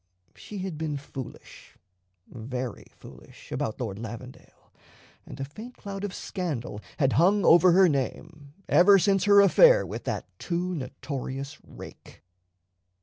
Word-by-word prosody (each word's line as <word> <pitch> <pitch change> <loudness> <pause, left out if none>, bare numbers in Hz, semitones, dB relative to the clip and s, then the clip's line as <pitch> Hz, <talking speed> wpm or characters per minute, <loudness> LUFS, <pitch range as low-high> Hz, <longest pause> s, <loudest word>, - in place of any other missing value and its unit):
She 210 - -10
had 185 -5 -5
been 155 -2 -2
foolish, 135 -2 -11 0.5
very 125 0 -6
foolish, - - -16
about 110 - -3
Lord 110 -5 -4
Lavendale, 120 +3 -11 0.5
and - - -10
a 135 - -3
faint 220 - -11
cloud 200 -1 -7
of 205 - -3
scandal 145 - -5 0.2
had 135 -4 +2
hung 190 +6 +3
over 175 +1 +6
her 190 +1 +6
name 145 +1 -4 0.2
ever 195 +3 +6
since 195 0 +2
her 205 0 +7
affair - - +6
with - - -7
that - - -3
too 180 +1 -2
notorious 135 -1 -6
rake. - - -13
160 Hz, 135 wpm, -26 LUFS, 130-190 Hz, 0.5 s, her